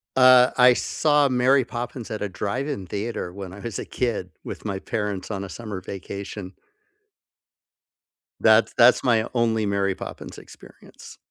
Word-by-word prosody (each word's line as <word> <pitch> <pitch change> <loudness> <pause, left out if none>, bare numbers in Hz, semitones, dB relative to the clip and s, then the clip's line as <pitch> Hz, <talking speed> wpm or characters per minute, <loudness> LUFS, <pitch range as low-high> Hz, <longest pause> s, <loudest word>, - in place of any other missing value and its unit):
Uh, 130 -1 +7
I 125 0 +7
saw 145 +3 +2
Mary 130 0 +3
Poppins 120 0 -6
at 110 - -5
a 105 - -2
drive-in 110 +3 -4
theater 100 -3 -4
when 95 -1 -8
I 100 - -11
was 115 -2 -5
a - - -4
kid, 115 -7 -2 0.2
with - - -7
my 100 -3 -3
parents 105 -3 -4
on 100 -2 -4
a 95 - -7
summer 105 -2 -7
vacation. 100 0 -7 1.9
That's - - +4
that's - - +6
my 115 -3 +2
only 115 -3 +1
Mary 100 -1 0
Poppins - - -9
experience. - - -15
110 Hz, 150 wpm, -24 LUFS, 100-125 Hz, 1.9 s, Uh